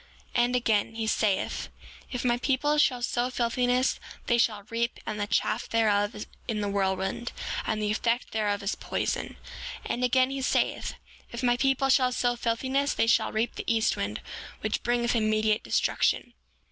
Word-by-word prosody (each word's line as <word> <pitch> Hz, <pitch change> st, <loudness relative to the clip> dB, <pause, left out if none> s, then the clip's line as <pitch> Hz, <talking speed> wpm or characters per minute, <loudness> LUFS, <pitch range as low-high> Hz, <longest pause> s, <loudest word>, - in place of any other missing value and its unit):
7:30 240 Hz, -, +5 dB
And 250 Hz, +1 st, -1 dB
again, 225 Hz, -2 st, +1 dB
he 225 Hz, -1 st, -2 dB
saith: 215 Hz, -2 st, 0 dB, 0.4 s
If 250 Hz, -1 st, -3 dB
my 240 Hz, 0 st, +2 dB
people 295 Hz, +3 st, +1 dB
shall 250 Hz, -4 st, +3 dB
sow 240 Hz, +1 st, 0 dB
filthiness 250 Hz, +1 st, +1 dB, 0.3 s
they 240 Hz, -1 st, +2 dB
shall 215 Hz, -3 st, +1 dB
reap 235 Hz, +1 st, -1 dB
the 210 Hz, -1 st, -2 dB
chaff 210 Hz, -, 0 dB
thereof 210 Hz, -1 st, +1 dB, 0.2 s
in 220 Hz, -3 st, -1 dB
the 205 Hz, -, -1 dB
whirlwind; 190 Hz, +3 st, -1 dB, 0.4 s
and 215 Hz, -, 0 dB
the 210 Hz, -1 st, 0 dB
effect 230 Hz, +3 st, 0 dB
thereof 205 Hz, -2 st, 0 dB
is 200 Hz, -, 0 dB
poison. -, -, -3 dB, 0.5 s
7:31 -, -, -1 dB
And 245 Hz, -, -2 dB
again 255 Hz, +1 st, +3 dB
he 275 Hz, 0 st, -3 dB
saith: 260 Hz, -, 0 dB, 0.4 s
If 235 Hz, +2 st, -5 dB
my 245 Hz, -1 st, +4 dB
people 270 Hz, +1 st, +2 dB
shall 255 Hz, -1 st, +4 dB
sow 245 Hz, -1 st, +1 dB
filthiness 260 Hz, +4 st, 0 dB
they -, -, +3 dB
shall 225 Hz, -, +3 dB
reap 220 Hz, +2 st, 0 dB
the -, -, -2 dB
east 225 Hz, -1 st, +2 dB
wind, -, -, -3 dB, 0.4 s
which -, -, -1 dB
bringeth 240 Hz, 0 st, +1 dB
immediate 215 Hz, -1 st, +2 dB
destruction. 115 Hz, -, +1 dB
235 Hz, 170 wpm, -28 LUFS, 215-250 Hz, 0.5 s, 7:30